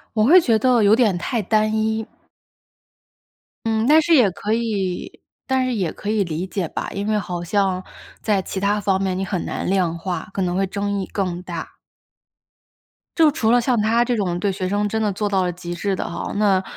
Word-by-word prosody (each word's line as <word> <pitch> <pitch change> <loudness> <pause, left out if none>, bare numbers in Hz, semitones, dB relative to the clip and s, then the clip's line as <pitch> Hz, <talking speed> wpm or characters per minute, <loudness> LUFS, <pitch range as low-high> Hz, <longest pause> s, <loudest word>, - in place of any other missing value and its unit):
我 215 - +3
会 335 +10 +8
觉 230 -8 +3
得 245 +1 +3
有 205 +2 +6
点 215 -7 +2
太 230 +7 -2
单 215 +1 +1
一。 220 0 0 1.6
嗯， 220 0 +1
但 310 +2 +6
是 330 +1 +3
也 245 -8 +5
可 210 +4 -2
以， 205 -6 -2 0.3
但 260 -1 +1
是 255 - -1
也 190 -7 -1
可 210 - -6
以 215 -2 +2
理 170 +1 -3
解 185 -3 -3
吧， - - -4
因 200 +1 -4
为 215 0 +1
好 175 -3 -5
像 190 0 0 0.4
在 205 -3 +1
其 190 - -5
它 205 +1 +1
方 195 -1 0
面 190 -1 -1
你 195 - -2
很 185 -3 -2
难 - - -4
量 180 -3 +1
化， 180 +2 -4
可 195 - -2
能 180 -1 0
会 195 +1 +1
争 200 +1 -2
议 190 - -3
更 180 -3 -2
大。 170 -3 -7 1.4
就 320 -2 +6
除 245 -7 0
了 245 - +5
像 240 -2 +1
她 230 +3 +2
这 245 0 0
种 180 -5 -1
对 200 +1 0
学 185 -1 -3
生 205 +1 0
真 220 +2 -2
的 210 -2 +1
做 205 +2 -2
到 195 -2 +1
了 180 -1 0
极 175 0 -7
致 195 +2 -1
的 - - -4
哈， - - -5
那 200 -3 +2
205 Hz, 230 characters per minute, -21 LUFS, 185-220 Hz, 1.6 s, 会